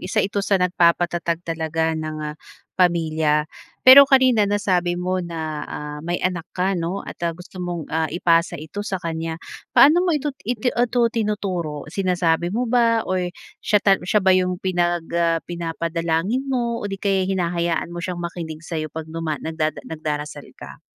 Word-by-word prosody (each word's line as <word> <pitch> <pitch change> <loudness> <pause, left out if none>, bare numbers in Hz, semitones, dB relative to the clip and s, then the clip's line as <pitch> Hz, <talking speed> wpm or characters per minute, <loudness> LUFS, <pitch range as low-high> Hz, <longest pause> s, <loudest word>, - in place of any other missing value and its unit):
isa 185 - 0
ito 200 0 -1
sa 200 0 +2
nagpapatatag 175 -1 +1
talaga 160 0 -1
ng, 155 -1 -4 0.2
ah, - - -14 0.4
pamilya. 160 -4 +2 0.4
Pero 275 +2 +10
kanina 255 -6 +4
nasabi 180 -4 +1
mo 185 +1 -1
na, 160 -3 -4
ah, 150 0 -6
may 175 +3 -2
anak 180 -3 -2
ka 185 +2 +1
'no, 180 +2 -3
at - - -10
ah, 170 -1 -2
gusto 180 +1 -11
mong, 175 -3 -4
ah, 160 0 +1
ipasa 170 -1 +2
ito 160 +7 -7
sa 205 -2 -3
kanya. 165 -1 -4 0.4
Paano 315 +5 +7
mo 350 -4 +2
ito 295 0 -2
iti 245 +2 -1
itu 245 0 +1
tinuturo? 190 -9 -2
Sinasabi 175 -3 +1
mo 235 +6 -1
ba, 230 -1 +2
or 185 -1 -1 0.3
siya 210 - +2
ta 195 -1 +4
siya 195 +1 +1
ba 190 - +6
yung 185 -1 +2
pinag 175 -2 0
ah, 170 -1 +2
pinapadalangin 170 - -2
mo? 235 -3 -1
O 205 - -4
'di 195 - -4
kaya'y 195 -1 0
hinahayaan 170 -2 -1
mo 175 - -5
siyang 175 -1 -4
makinig 165 -2 -6
sa'yo 155 -2 -3
'pag 160 +1 -6
duma 165 -2 -2
nagdada 155 -1 -3
nagdarasal 150 -2 -5
ka? - - -11
175 Hz, 170 wpm, -22 LUFS, 165-195 Hz, 0.4 s, Pero